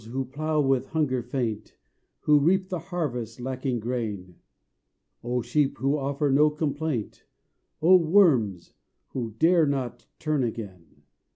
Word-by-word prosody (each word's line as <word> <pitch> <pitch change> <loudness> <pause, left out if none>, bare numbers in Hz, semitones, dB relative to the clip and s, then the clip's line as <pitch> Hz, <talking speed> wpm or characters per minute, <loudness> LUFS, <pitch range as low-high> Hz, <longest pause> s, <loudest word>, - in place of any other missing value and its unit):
who 135 +1 -2
plough, 155 +4 -2
with 135 -2 +1
hunger 145 -6 0
faint; 115 -4 -4 0.5
Who 150 -1 +4
reap 185 +5 +2
the 180 - -2
harvest, 125 - -3
lacking 130 -1 -3
grain; 105 -7 -4 0.9
Oh 120 0 -1
Sheep! 145 +1 0
who 135 +2 +1
offer 140 0 -1
no 150 +3 +5
complaint; 150 -5 -3 0.6
Oh 185 +3 +8
Worms! 155 - +3 0.4
who 115 -5 -5
dare 165 -1 +4
not 135 -4 -3
turn 155 -4 0
again. 105 -7 -7
135 Hz, 125 wpm, -26 LUFS, 120-155 Hz, 0.9 s, Oh